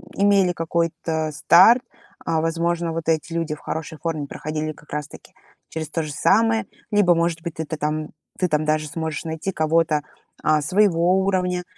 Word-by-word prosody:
имели 200 Hz, -2 st, +3 dB
какой-то 165 Hz, -1 st, -1 dB
старт. 190 Hz, -, +6 dB, 0.4 s
А, 160 Hz, -1 st, +1 dB
возможно, 170 Hz, +1 st, -1 dB
вот 165 Hz, 0 st, -3 dB
эти 160 Hz, +1 st, 0 dB
люди 165 Hz, -2 st, -1 dB
в 150 Hz, -, -8 dB
хорошей 160 Hz, 0 st, -5 dB
форме 160 Hz, -3 st, -3 dB
проходили 155 Hz, +2 st, -4 dB
как 150 Hz, 0 st, -16 dB
раз-таки 150 Hz, -1 st, -7 dB, 0.4 s
через 155 Hz, -2 st, -5 dB
то 165 Hz, -, -2 dB
же 150 Hz, -1 st, -6 dB
самое. 225 Hz, +8 st, +3 dB, 0.3 s
Либо, 205 Hz, -4 st, +4 dB
может 170 Hz, 0 st, 0 dB
быть, 170 Hz, -2 st, -5 dB
ты-то 160 Hz, 0 st, -4 dB
там, 150 Hz, +1 st, -2 dB, 0.3 s
ты 185 Hz, -, +2 dB
там 155 Hz, -2 st, +1 dB
даже 155 Hz, 0 st, 0 dB
сможешь 160 Hz, +1 st, -4 dB
найти 160 Hz, +4 st, -3 dB
кого-то, 155 Hz, -2 st, +1 dB, 0.4 s
а, 155 Hz, 0 st, +3 dB
своего 180 Hz, +2 st, +3 dB
уровня. 180 Hz, -2 st, 0 dB
165 Hz, 165 wpm, -22 LUFS, 155-175 Hz, 0.4 s, старт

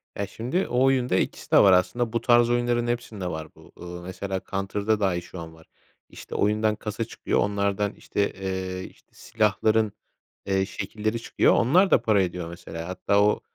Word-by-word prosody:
Ya, 100 Hz, -, -3 dB
şimdi 125 Hz, -, -2 dB
o 125 Hz, +1 st, +1 dB
oyunda 130 Hz, -5 st, +2 dB
2'si -, -, -2 dB
de -, -, +6 dB
var 95 Hz, -2 st, +7 dB
aslında 115 Hz, +6 st, +1 dB
bu 115 Hz, -, 0 dB
tarz 120 Hz, -1 st, +4 dB
oyunların 120 Hz, 0 st, +1 dB
hepsinde 115 Hz, -5 st, -3 dB
var 80 Hz, -2 st, -6 dB
bu. -, -, -17 dB
Iıı, 90 Hz, 0 st, -8 dB
mesela 95 Hz, +1 st, -4 dB
Counter'da 100 Hz, +2 st, -1 dB
dahi 95 Hz, -4 st, +1 dB
şu 90 Hz, +1 st, -10 dB
an 80 Hz, -1 st, -8 dB
var. 80 Hz, 0 st, -18 dB, 0.4 s
İşte, -, -, -10 dB
oyundan 105 Hz, +1 st, +2 dB
kasa 105 Hz, +1 st, -4 dB
çıkıyor -, -, -2 dB
onlardan, 100 Hz, 0 st, 0 dB
işte, 100 Hz, -, -2 dB
eee, 95 Hz, -1 st, -4 dB
işte, -, -, -15 dB
silahların, 110 Hz, 0 st, +1 dB, 0.5 s
eee, 95 Hz, -1 st, +1 dB
şekilleri 110 Hz, +3 st, -3 dB
çıkıyor, -, -, +3 dB
onlar 180 Hz, +11 st, +4 dB
da -, -, +5 dB
para 110 Hz, -4 st, +3 dB
ediyor 90 Hz, -2 st, -4 dB
mesela. 85 Hz, -1 st, -8 dB
Hatta 100 Hz, +2 st, +1 dB
o 105 Hz, 0 st, +2 dB
100 Hz, 175 wpm, -25 LUFS, 95-115 Hz, 0.5 s, var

